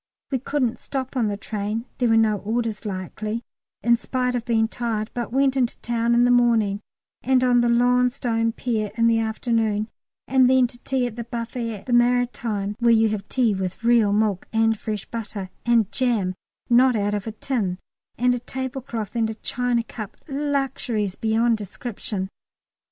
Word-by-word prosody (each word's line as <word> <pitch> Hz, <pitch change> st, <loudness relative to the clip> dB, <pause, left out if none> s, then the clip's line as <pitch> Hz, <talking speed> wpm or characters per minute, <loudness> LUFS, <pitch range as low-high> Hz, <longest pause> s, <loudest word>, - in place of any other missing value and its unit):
We 265 Hz, -, +1 dB
couldn't 255 Hz, -2 st, -1 dB
stop 265 Hz, -1 st, -4 dB
on 240 Hz, -4 st, +2 dB
the 205 Hz, -1 st, -2 dB
train 210 Hz, +2 st, -3 dB
(there 245 Hz, -2 st, +2 dB
were 225 Hz, -, +5 dB
no 220 Hz, -2 st, +3 dB
orders 225 Hz, +1 st, -2 dB
likely), 210 Hz, +4 st, -4 dB, 0.4 s
in 235 Hz, 0 st, +4 dB
spite 250 Hz, +1 st, -1 dB
of 240 Hz, -2 st, -2 dB
being 225 Hz, -2 st, +2 dB
tired, 225 Hz, -2 st, -3 dB
but 240 Hz, -2 st, -3 dB
went 270 Hz, +1 st, +2 dB
in 255 Hz, -3 st, +3 dB
the -, -, -9 dB
town 235 Hz, 0 st, +1 dB
in 240 Hz, -, +5 dB
the 245 Hz, -, +4 dB
morning, 225 Hz, -4 st, +3 dB, 0.4 s
and 255 Hz, 0 st, +3 dB
on 245 Hz, -1 st, +4 dB
the 240 Hz, -, +2 dB
long 245 Hz, +1 st, +4 dB
stone 230 Hz, -3 st, 0 dB
pier 225 Hz, -3 st, -2 dB
in 230 Hz, -, +2 dB
the 230 Hz, -1 st, +4 dB
afternoon, 220 Hz, -1 st, 0 dB, 0.4 s
and 260 Hz, -1 st, +5 dB
then 260 Hz, -1 st, +5 dB
to 240 Hz, 0 st, -7 dB
tea 260 Hz, 0 st, 0 dB
at 240 Hz, -1 st, -5 dB
the 235 Hz, -, -3 dB
buffet 230 Hz, -2 st, -4 dB
at -, -, -22 dB
the 250 Hz, -, -2 dB
Maritime 240 Hz, -4 st, +1 dB
(where 235 Hz, -1 st, +3 dB
you 225 Hz, -1 st, +5 dB
have 205 Hz, -2 st, -4 dB
tea 240 Hz, -5 st, +2 dB
with 190 Hz, +2 st, -4 dB
real 230 Hz, -3 st, +4 dB
milk 205 Hz, -2 st, +1 dB
and 225 Hz, -1 st, +2 dB
fresh 215 Hz, -2 st, -4 dB
butter, 205 Hz, -5 st, -6 dB, 0.2 s
and 230 Hz, -4 st, +3 dB
jam 230 Hz, -8 st, +1 dB, 0.3 s
not 250 Hz, +1 st, +5 dB
out 205 Hz, -1 st, 0 dB
of 205 Hz, +1 st, -3 dB
a -, -, -2 dB
tin, 215 Hz, -5 st, -2 dB, 0.4 s
and 250 Hz, +1 st, +3 dB
a 245 Hz, -, -1 dB
tablecloth, 245 Hz, -4 st, -5 dB
and 225 Hz, -1 st, +1 dB
a 220 Hz, -, -4 dB
china 245 Hz, +1 st, -1 dB
cup 215 Hz, -2 st, -8 dB
luxuries 270 Hz, -8 st, -1 dB
beyond 225 Hz, +2 st, +1 dB
description). 205 Hz, -1 st, -5 dB
230 Hz, 185 wpm, -23 LUFS, 215-245 Hz, 0.4 s, were